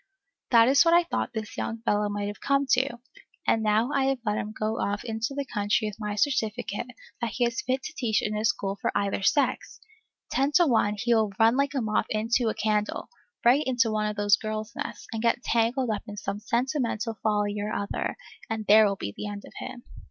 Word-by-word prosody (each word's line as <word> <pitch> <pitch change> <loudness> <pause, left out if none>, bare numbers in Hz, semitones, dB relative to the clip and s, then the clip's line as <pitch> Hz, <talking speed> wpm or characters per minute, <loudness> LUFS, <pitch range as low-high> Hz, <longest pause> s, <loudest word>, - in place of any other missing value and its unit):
That 230 -2 +6
is 275 +4 +6
what 335 0 +5
I 345 - +6
thought 335 -6 -3
this 220 -2 -5
young 225 0 -4
fellow 210 -1 +1
might 205 0 -3
have 205 +1 -6
come 280 0 +2
to; 265 0 +2 0.5
and 225 - +2
now 220 +4 +2
I 275 -1 +2
have 270 0 +1
let 210 0 0
him 210 - -4
go 215 +1 -2
off 205 +1 -1
into 225 +4 -3
the 280 0 -2
country 210 -2 0
with 210 - -11
my 210 -1 -3
certificate, 225 -3 -1 0.3
that 235 -2 -2
he 245 - +1
is 235 -1 -1
fit 260 +2 -1
to - - -6
teach 220 -4 0
in 215 0 -1
a 210 - -2
school 200 -2 0
for - - 0
either 200 -1 -1
sex! 280 +9 +1 0.5
Ten 275 +2 +1
to 350 +2 +6
one 220 -6 +2
he 240 +3 +1
will 220 -3 +2
run 225 +2 +5
like 280 +1 0
a 265 - +1
moth 215 -1 0
into 225 +2 +1
a - - -3
candle, 210 -1 -1 0.4
right 255 +5 +6
into 245 -4 +1
one 215 0 0
of 210 - -3
those 205 0 +4
girls' 215 0 -5
nests, - - -5
and 225 - -3
get 235 +1 +1
tangled 235 +1 +1
up 210 - -2
in 205 0 -8
some 200 0 -4
sentimental 235 -1 -1
folly 210 -1 +1
or 210 +1 -3
other, 200 -1 -3 0.3
and 220 -1 -3
there 215 +1 +7
will 200 - -1
be 100 - -5
the 210 - -5
end 205 0 -6
of - - -14
him. 240 - -7
220 Hz, 225 wpm, -27 LUFS, 210-245 Hz, 0.5 s, there